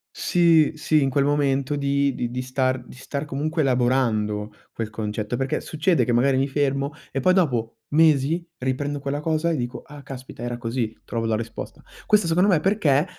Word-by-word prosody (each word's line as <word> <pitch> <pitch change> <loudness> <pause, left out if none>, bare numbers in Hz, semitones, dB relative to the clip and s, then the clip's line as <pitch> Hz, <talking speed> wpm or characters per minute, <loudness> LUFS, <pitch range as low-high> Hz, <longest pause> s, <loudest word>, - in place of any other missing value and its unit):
Sì, 165 -3 +4
sì, 155 0 +2
in 135 - +1
quel 140 +1 +1
momento 145 -1 +1
di 140 -1 +1
di 120 0 -3
di 125 +1 -3
star 130 0 -1
di 125 - -14
star 140 +3 -5
comunque 155 +3 -2
elaborando 120 -5 +1 0.2
quel 110 -2 -4
concetto, 110 +1 -3
perché 135 0 -1
succede 165 +3 +1
che 120 - 0
magari 130 +2 +3
mi 135 +1 +2
fermo 140 0 0 0.2
e 135 - -1
poi 185 +7 +4
dopo 125 -12 +1
mesi 155 +1 +3
riprendo 140 +3 -2
quella 140 +1 -3
cosa 160 +2 0
e - - 0
dico: 120 -2 -4
"Ah 145 -1 -11
caspita, 130 -2 -10
era 120 0 -3
così", 115 -1 -3
trovo 115 -1 -3
la 110 -1 +1
risposta. 115 0 -6 0.2
Questo 210 -4 +4
secondo 180 +5 +3
me 175 -5 +4
perché 160 -6 +2
135 Hz, 185 wpm, -23 LUFS, 120-150 Hz, 0.2 s, Sì